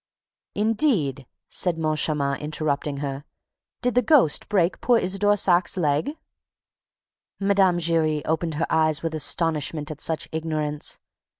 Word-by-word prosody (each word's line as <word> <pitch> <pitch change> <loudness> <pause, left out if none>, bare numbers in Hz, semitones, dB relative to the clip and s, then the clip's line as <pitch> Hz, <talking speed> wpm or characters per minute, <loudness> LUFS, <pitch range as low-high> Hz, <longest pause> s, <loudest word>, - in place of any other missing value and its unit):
"Indeed!" 205 - 0 0.2
said 175 -3 -1
Moncharmin, 150 -3 0
interrupting 150 -1 -2
her. 135 0 -5 0.6
"Did 250 -1 +1
the 250 - +3
ghost 240 - +3
break 185 -4 +1
poor 245 -1 +3
Isidore 205 +1 +2
Saack's 180 -1 +2
leg?" 160 - 0 1.2
Mme. 195 -3 +3
Giry 160 -3 +1
opened 160 0 -1
her 155 - 0
eyes 155 0 +1
with 165 -1 -2
astonishment 155 -1 0
at 150 - -8
such 160 -1 -1
ignorance. 155 -2 -3
160 Hz, 120 wpm, -24 LUFS, 150-190 Hz, 1.2 s, the